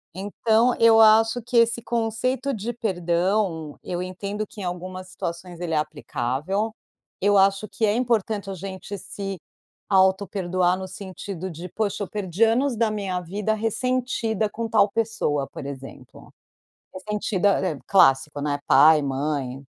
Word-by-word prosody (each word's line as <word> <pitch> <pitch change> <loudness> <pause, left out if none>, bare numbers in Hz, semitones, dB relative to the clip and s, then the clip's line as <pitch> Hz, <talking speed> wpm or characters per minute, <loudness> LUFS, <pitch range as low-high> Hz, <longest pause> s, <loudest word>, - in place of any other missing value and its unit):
Então, 220 +5 +2
eu 225 -1 +7
acho 225 +2 +5
que 240 +2 -1
esse 230 0 +3
conceito 240 +4 -1
de 220 +1 -3
perdão, 180 -5 -1
eu 175 0 -3
entendo 200 +3 -4
que 210 - -11
em - - -5
algumas 185 +1 -5
situações 170 -1 -6
ele 175 -2 -3
é - - +2
aplicável, 155 - -2 0.5
eu 205 +1 +3
acho 195 +2 +3
que 205 +3 -1
é 205 - +2
importante 220 -4 0
a - - -3
gente 190 +2 -7
se 195 +1 -6 0.5
autoperdoar 190 -2 +2
no 190 0 -6
sentido 190 -1 -7
de: 170 +3 -7
"Poxa, 205 +1 -2
eu - - -5
perdi 200 0 -1
anos 240 +3 +2
da 225 0 +2
minha 200 -4 -2
vida 200 +5 -2
ressentida 225 -1 -1
com 225 +2 -4
tal 210 -2 +4
pessoa", 205 -11 -1
por - - -9
exemplo. 135 -1 -10 0.6
Ressentida, 205 0 0
é 185 - 0
é 145 - -8
clássico, 145 -5 +4
né? 145 0 -1
Pai, 150 +2 +6
mãe, 135 -1 -2
195 Hz, 150 wpm, -24 LUFS, 175-220 Hz, 0.6 s, eu